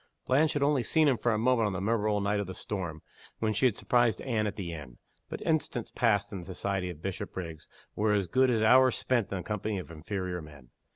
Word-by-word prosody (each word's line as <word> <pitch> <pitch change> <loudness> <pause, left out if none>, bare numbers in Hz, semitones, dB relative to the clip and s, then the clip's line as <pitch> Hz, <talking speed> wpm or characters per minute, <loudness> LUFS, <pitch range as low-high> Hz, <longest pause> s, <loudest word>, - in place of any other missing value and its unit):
Blanche 150 +5 +3
had 145 -2 0
only 140 -2 +3
seen 155 +6 +3
him 135 - +4
for 120 +1 0
a 105 - +1
moment 115 -1 +3
on 100 - -2
the 90 - -2
memorable 105 0 +1
night 100 +1 +1
of 100 - -3
the 95 - -6
storm, 85 -6 -5 0.3
when 110 -1 0
she 130 +5 +4
had 115 - -2
surprised 120 -5 +2
Anne 110 -5 0
at 100 - -4
the 85 -4 -5
inn. 70 -6 -9 0.3
But - - -6
instants 150 -7 -1
passed 105 -4 +1
in 95 - -4
the 85 - -9
society 95 0 -2
of 80 -3 -9
Bishopriggs 90 -4 -5 0.3
were 105 0 +2
as 100 -2 +2
good 130 +9 +3
as 115 -3 +2
hours 130 +3 +6
spent 120 -5 0
in 100 - -1
the 90 - -5
company 105 +1 -2
of 90 -2 -7
inferior 90 +2 -4
men. 75 -5 -14
105 Hz, 235 wpm, -29 LUFS, 90-120 Hz, 0.3 s, hours